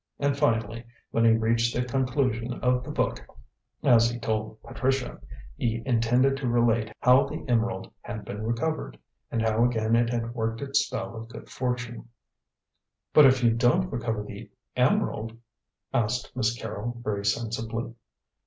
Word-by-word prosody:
And, 140 -1 +1
finally, 115 -5 0 0.3
when 115 0 +2
he 115 - +6
reached 115 +1 +1
the 125 - +1
conclusion 125 -2 0
of 125 0 +2
the - - -9
book, 60 - -1 0.6
as 115 -1 +5
he 120 - -4
told 110 -2 -3
Patricia, 130 - -2 0.3
he 115 - -1
intended 125 +2 +3
to 135 -2 -3
relate 115 -2 +2
how 125 +2 +5
the 155 +1 -6
emerald 115 -5 0
had 105 0 -7
been 105 - -6
recovered, 120 +8 -2 0.3
and 115 -1 -1
how 110 +1 +2
again 115 -2 +2
it 115 0 +3
had 120 -1 -2
worked 115 -1 -2
its 140 0 +1
spell - - -5
of 115 0 -8
good 115 - -10
fortune. 125 +1 -3 1.0
"But 150 -3 +9
if 130 -1 +3
you 115 - +5
don't 125 +11 +2
recover 115 -4 -2
the - - -9 0.3
emerald?" 115 +1 +1 0.6
asked 120 0 -1
Miss 110 -4 +2
Carrol 115 +2 -5
very 100 -2 -2
sensibly. 115 +2 -2
115 Hz, 155 wpm, -27 LUFS, 115-125 Hz, 1.0 s, But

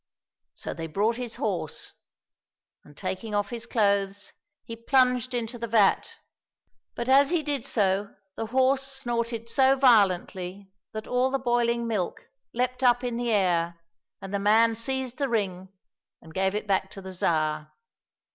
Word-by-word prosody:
" - - -66
So - - -6
they 165 0 -6
brought 210 +8 0
his 245 -2 -5
horse, 185 -8 -3 0.9
and, 145 -1 -18
taking 190 +3 -4
off 205 -1 -1
his 235 0 -4
clothes, 200 -3 0 0.3
he 230 - -6
plunged 250 +1 +2
into 235 0 -3
the 235 - -3
vat, 215 -3 +2 0.8
but 235 - -4
as 275 +1 +5
he 345 -3 +1
did 285 -4 -2
so 200 -5 0 0.2
the 225 - -4
horse 260 +3 +2
snorted 240 -4 -3
so 265 +2 +4
violently 195 -6 +2 0.2
that 215 0 -6
all 250 +1 +1
the 270 - 0
boiling 240 -2 +1
milk 210 -6 -2 0.3
leaped 250 +2 -2
up 245 -1 +4
in 245 -1 -2
the 240 0 -2
air 175 -5 +1 0.4
and 195 +1 -7
the 200 - 0
man 220 +3 +4
seized 255 +2 -3
the 275 -2 0
ring 190 -5 -2 0.5
and 160 - -15
gave 190 +2 0
it 210 - -2
back 190 -1 0
to 195 - -9
the 190 0 -7
Tsar. 155 -3 0
225 Hz, 160 wpm, -26 LUFS, 195-250 Hz, 0.9 s, as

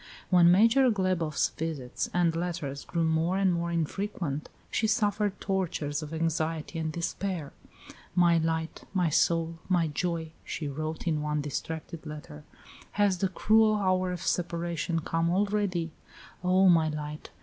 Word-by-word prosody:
When 175 -1 +7
Major 230 +7 +5
Glebof's 185 -7 +1
visits 150 -6 -4
and 175 -2 +2
letters 165 -5 -3
grew 170 -1 -1
more 160 +3 +1
and 195 -2 +3
more 170 0 -1
infrequent, 170 -3 -2 0.2
she 220 - +1
suffered 210 -2 +1
tortures 165 -6 -1
of 155 0 -7
anxiety 165 0 -1
and 160 -1 -2
despair. 170 -1 -3 0.6
"My 170 -2 +5
light, 160 0 -2
my 180 -3 +3
soul, 165 +1 +1
my 175 -3 +3
joy," 165 +1 -2
she 155 - -4
wrote 155 +3 -4
in 155 -3 0
one 150 0 -1
distracted 160 +3 -5
letter, 150 - -9 0.5
"has 200 -3 +2
the 195 - +1
cruel 215 +3 +4
hour 185 -2 +1
of 180 - -5
separation 170 -1 -1
come 165 +1 0
already? 190 -3 0 0.5
O, 185 +1 +4
my 165 -3 +5
light! 150 0 -6
170 Hz, 140 wpm, -29 LUFS, 160-185 Hz, 0.6 s, When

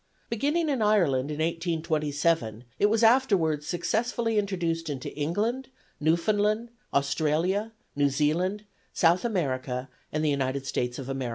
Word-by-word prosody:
Beginning 295 +8 +1
in 275 -6 0
Ireland 170 -11 +2
in 150 - -4
1827 155 - 0 0.2
it 205 - +5
was 225 +2 +2
afterwards 195 - +3
successfully 225 +5 0
introduced 170 -5 -2
into 135 -3 -5
England, 210 - -1 0.3
Newfoundland, 210 +8 +1 0.2
Australia, 160 +9 +1 0.2
New 145 0 +3
Zealand, 170 +9 0 0.3
South 170 +1 +4
America 130 - -2 0.2
and 155 +1 -1
the 150 - +3
United 135 -1 -1
States 125 -1 -2
of 135 - -6
America. 135 -2 -3
165 Hz, 125 wpm, -27 LUFS, 145-210 Hz, 0.3 s, it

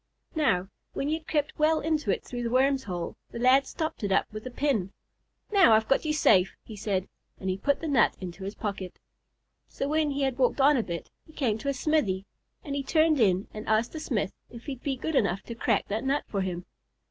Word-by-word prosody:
Now, 225 - +1 0.3
when 280 - -2
he - - +1
had 320 0 -4
crept 300 0 -1
well 310 +1 +4
into 310 -7 -1
it 195 - +1
through 245 -1 -5
the 235 - -1
worm's 265 +2 +2
hole, 175 -3 -4
the - - -8
lad 260 +3 +4
stopped 315 -7 -4
it 200 - -1
up 190 - +3
with 215 +3 -6
a - - -4
pin. 245 -8 0 0.6
"Now, 385 - +6
I've 220 0 +3
got 270 - +2
you 310 - +1
safe," 195 -11 +4
he 220 - -10
said, 195 -2 -1 0.3
and 190 0 -3
put 285 +5 +1
the 325 - -3
nut 275 -5 +3
into 185 0 -7
his 200 +2 -5
pocket. 195 -4 -5 0.7
So 275 - -3
when 305 0 +1
he 280 0 -1
had 265 -1 -1
walked 255 +2 +2
on 285 +2 +6
a 250 - +2
bit, 170 -5 -6 0.2
he 315 - -16
came 225 -8 0
to 280 - -2
a - - +1
smithy, 250 -11 +1 0.4
and 285 - -5
he 280 - 0
turned 310 +1 +3
in 195 -3 +3
and 215 0 -7
asked 220 +2 +2
the 315 - -6
smith 215 -10 -1 0.2
if 235 -1 -11
he'd 265 -4 -6
be 275 -2 -1
good 320 +5 -4
enough 195 -6 +1
to 235 - -7
crack 230 -2 0
that 215 +3 -1
nut 275 +2 +1
for 200 - -2
him. 180 -1 -3
245 Hz, 230 wpm, -28 LUFS, 200-290 Hz, 0.7 s, Now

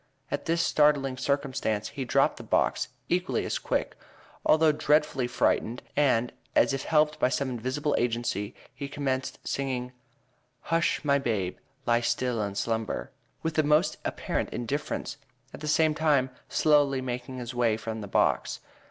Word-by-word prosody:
At 145 - -2
this 165 +1 +2
startling 145 -3 +3
circumstance 130 -5 -1
he 135 -2 -5
dropped - - +2
the - - -8
box; - - +1 0.2
equally 180 +1 0
as - - -1
quick, - - -1 0.5
although 155 0 +5
dreadfully 150 -3 +2
frightened, 120 -1 0
and, 125 -5 +2 0.2
as - - +4
if 135 0 -3
helped 150 -1 +2
by - - +3
some 135 0 -1
invisible 130 +5 -1
agency, 115 -3 -1 0.2
he 140 - -5
commenced 135 -2 -2
singing, 130 -2 -2 0.7
"Hush, 165 -2 0
my 140 -1 +4
babe, 105 -8 -1 0.3
lie 120 0 +3
still 120 0 0
and 100 -1 -3
slumber," 110 +1 -2 0.3
with 160 0 -1
the 155 - +3
most 150 +1 +3
apparent - - -2
indifference, 140 +5 -3 0.4
at - - -8
the 150 - -6
same 155 +1 +3
time 145 -4 +2 0.2
slowly 145 -3 +3
making 125 0 -4
his 125 0 -5
way 120 -3 +2
from 110 0 -5
the 100 - -6
box. - - +1
130 Hz, 150 wpm, -28 LUFS, 120-150 Hz, 0.7 s, although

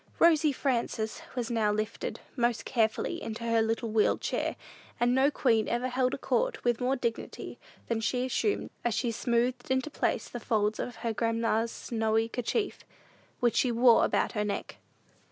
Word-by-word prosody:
"Rosy 315 -3 +5
Frances" 235 -5 -1
was 245 -1 -2
now 220 -3 +2
lifted 215 +1 -3 0.2
most 240 -3 0
carefully 235 +8 0
into 225 +1 -5
her 230 -1 +2
little 225 0 -1
wheeled 215 -1 +3
chair - - -1 0.4
and 240 +1 +3
no 265 +2 +4
queen 230 -7 +2
ever 245 +2 0
held 255 0 +1
a - - -7
court - - 0
with 240 0 +1
more 255 +2 +2
dignity 235 -3 -4 0.3
than 230 -1 -1
she 250 +2 0
assumed 405 - -1
as 240 -2 0
she 240 - 0
smoothed 240 +2 0
into 260 +3 0
place - - -1
the 240 - -6
folds 215 -2 0
of 245 - -4
her 230 -1 -3
grandma's 230 0 0
snowy 225 -1 0
kerchief, 245 - -2 0.6
which 240 -2 +2
she 250 - +3
wore 235 0 +6
about - - +1
her 210 - -1
neck. 205 -1 -4
235 Hz, 170 wpm, -29 LUFS, 225-255 Hz, 0.6 s, wore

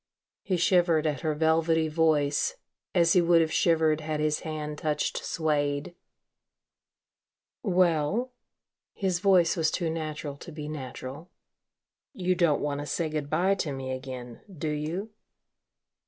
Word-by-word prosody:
He 185 - -1
shivered 170 -2 +3
at 150 -3 0
her 155 -2 0
velvety 160 +1 +2
voice, 155 - +2 0.4
as 170 -2 +5
he 180 - +5
would 170 0 +5
have 160 -1 +1
shivered 160 -2 +3
had 155 0 -3
his 150 0 +1
hand 150 -1 -5
touched 150 -1 -1
suede. 150 +1 -1 1.7
"Well," 185 +4 +1 0.6
his 185 -3 0
voice 185 -3 +4
was 160 -3 +2
too 165 -1 -1
natural 155 -3 -4
to 170 - -10
be 150 -1 -6
natural, 140 +2 -7 0.8
"you 185 -6 0
don't 170 -5 +2
want 145 -1 -2
to 145 - -5
say 155 +3 -1
good 150 -2 -3
bye 180 +6 +2
to 170 -6 -2
me 135 -1 -4
again, 130 -2 -7
do 160 -3 -4
you?" 160 +8 -3
155 Hz, 140 wpm, -28 LUFS, 150-170 Hz, 1.7 s, as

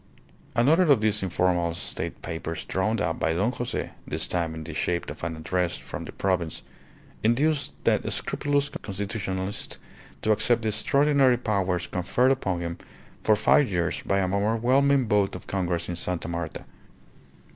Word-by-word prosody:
Another 155 +10 +5
of 130 -6 +5
these 110 -1 +2
informal 90 -2 +1
State - - -4
papers 80 0 -4
drawn 105 +4 0
up 85 -5 -1
by 80 - +1
Don 100 +8 +1
Jose 120 0 -3 0.2
(this - - -1
time 85 -2 -1
in 80 - -6
the 80 +1 -7
shape 85 +3 -1
of - - -9
an 85 -1 -2
address 90 +2 -1
from - - -7
the - - -7
Province) 90 -5 -1 0.6
induced 140 +6 +2
that - - +2
scrupulous 145 0 0
constitutionalist 100 - -4 0.5
to 110 - +3
accept 115 +2 +2
the 110 - +1
extraordinary 135 +4 +3
powers 95 -6 0
conferred 120 +8 +1
upon 95 -10 0
him 85 0 -4 0.4
for 110 - +4
five 130 +5 +4
years 85 -3 0
by 100 - 0
an 95 -1 0
overwhelming 125 +6 +3
vote 100 -2 +2
of 90 - -8
congress 90 -3 -1
in 90 - -3
Sta. 85 -1 -3
Marta. 85 -1 -4
100 Hz, 155 wpm, -26 LUFS, 85-120 Hz, 0.6 s, Another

